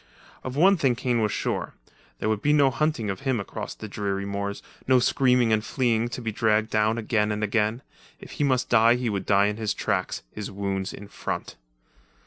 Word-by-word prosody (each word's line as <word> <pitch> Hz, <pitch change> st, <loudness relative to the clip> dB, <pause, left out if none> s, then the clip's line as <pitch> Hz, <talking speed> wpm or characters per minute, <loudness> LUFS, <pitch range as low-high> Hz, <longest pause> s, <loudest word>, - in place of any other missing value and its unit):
Of 130 Hz, 0 st, -5 dB
one 190 Hz, +6 st, +5 dB
thing 135 Hz, -6 st, +2 dB
Kane 120 Hz, -1 st, 0 dB
was 105 Hz, -1 st, +1 dB
sure; -, -, -3 dB, 0.4 s
there -, -, -3 dB
would 110 Hz, -1 st, 0 dB
be 150 Hz, -, +3 dB
no 140 Hz, -3 st, +4 dB
hunting 125 Hz, -6 st, 0 dB
of 95 Hz, -, -6 dB
him 135 Hz, -4 st, 0 dB
across 100 Hz, -, -6 dB
the 110 Hz, -, -8 dB
dreary 100 Hz, -1 st, -3 dB
moors, 100 Hz, 0 st, -4 dB, 0.2 s
no 130 Hz, 0 st, +5 dB
screaming 125 Hz, -2 st, +3 dB
and 110 Hz, 0 st, +1 dB
fleeing 120 Hz, -2 st, 0 dB
to 120 Hz, -, -6 dB
be 110 Hz, -, -2 dB
dragged 110 Hz, 0 st, +1 dB
down 110 Hz, +1 st, +2 dB
again 105 Hz, -2 st, 0 dB
and 105 Hz, 0 st, -2 dB
again. 110 Hz, +3 st, 0 dB, 0.4 s
If -, -, -12 dB
he -, -, -2 dB
must 130 Hz, -2 st, +1 dB
die 115 Hz, 0 st, +5 dB
he 125 Hz, -2 st, -1 dB
would 100 Hz, -2 st, -3 dB
die 100 Hz, 0 st, +4 dB
in 105 Hz, +1 st, -1 dB
his 110 Hz, -2 st, -2 dB
tracks, 95 Hz, -2 st, -2 dB
his 105 Hz, -2 st, -6 dB
wounds 95 Hz, -1 st, -3 dB
in 100 Hz, -, -10 dB
front. -, -, -5 dB
110 Hz, 205 wpm, -25 LUFS, 105-125 Hz, 0.4 s, one